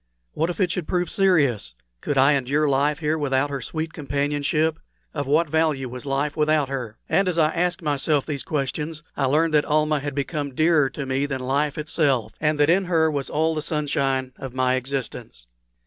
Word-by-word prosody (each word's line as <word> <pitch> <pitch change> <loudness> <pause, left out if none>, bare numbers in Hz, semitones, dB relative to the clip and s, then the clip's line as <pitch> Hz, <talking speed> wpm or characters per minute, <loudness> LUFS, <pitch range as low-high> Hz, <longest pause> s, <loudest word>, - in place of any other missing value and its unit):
What 160 +3 0
if 175 - -5
it 180 -3 +2
should 180 -3 -3
prove 180 -1 -1
serious? 140 - +2 0.3
Could 145 - -2
I 135 +3 +6
endure 140 +3 +1
life 140 +2 +2
here 155 0 -1
without 145 0 0
her 140 -2 -3
sweet 160 +5 -4
companionship? 145 +2 -1 0.3
Of 145 -3 -3
what 155 +4 +3
value 155 -3 +1
was 125 +2 -8
life 140 +2 -1
without 150 -2 +2
her? 120 -5 -5
And 195 -1 +2
as 180 -2 0
I 155 -1 +3
asked 180 +1 0
myself 145 -1 +1
these 145 -4 -3
questions 150 +2 -3
I 140 - 0
learned 155 +4 +2
that 150 -1 +4
Almah 150 0 +2
had 145 -1 -5
become 140 -1 -3
dearer 155 -3 +3
to 140 - -6
me 135 +2 0
than 135 -2 -3
life 140 +3 0
itself, 145 -5 0
and 150 -1 +1
that 145 - +5
in 185 +4 +3
her 160 -3 +2
was 140 -2 -3
all 160 +2 +1
the 155 - -2
sunshine 135 -4 -1
of 130 -2 -8
my 130 -1 +2
existence. 130 - -4
145 Hz, 195 wpm, -23 LUFS, 135-160 Hz, 0.3 s, I